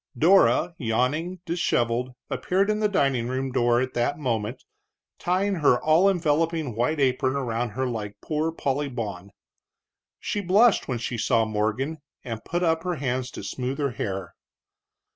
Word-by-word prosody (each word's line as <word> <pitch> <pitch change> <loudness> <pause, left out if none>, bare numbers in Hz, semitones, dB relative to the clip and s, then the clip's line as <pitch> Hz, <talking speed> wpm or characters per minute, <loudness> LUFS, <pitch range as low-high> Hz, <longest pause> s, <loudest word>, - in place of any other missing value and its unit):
Dora, 180 +1 +4
yawning, 145 +10 -1
disheveled, 125 -7 0
appeared 195 +3 +1
in 210 - -1
the 215 - +3
dining 135 -10 +1
room 130 +1 -2
door 120 -1 +3
at 130 0 -2
that 120 +4 0
moment, 120 -4 -2 0.6
tying 190 +3 +1
her 140 -6 +4
all 165 +5 +4
enveloping 165 - 0
white 125 +7 0
apron 130 0 +1
around 120 -3 -1
her 130 - +1
like 110 -5 -4
Poor 155 +1 -1
Polly 145 -2 -1
Bawn. 100 -7 -5 0.9
She 205 - -2
blushed 200 +4 +4
when 125 - -1
she 120 0 -4
saw 115 0 +2
Morgan, 110 +8 -1 0.2
and 115 -4 -6
put 175 +2 -2
up 160 -1 +2
her 180 0 -2
hands 130 -3 -2
to - - -8
smooth 130 +1 -3
her 140 -3 0
hair. 95 -5 -4
135 Hz, 155 wpm, -25 LUFS, 120-165 Hz, 0.9 s, Dora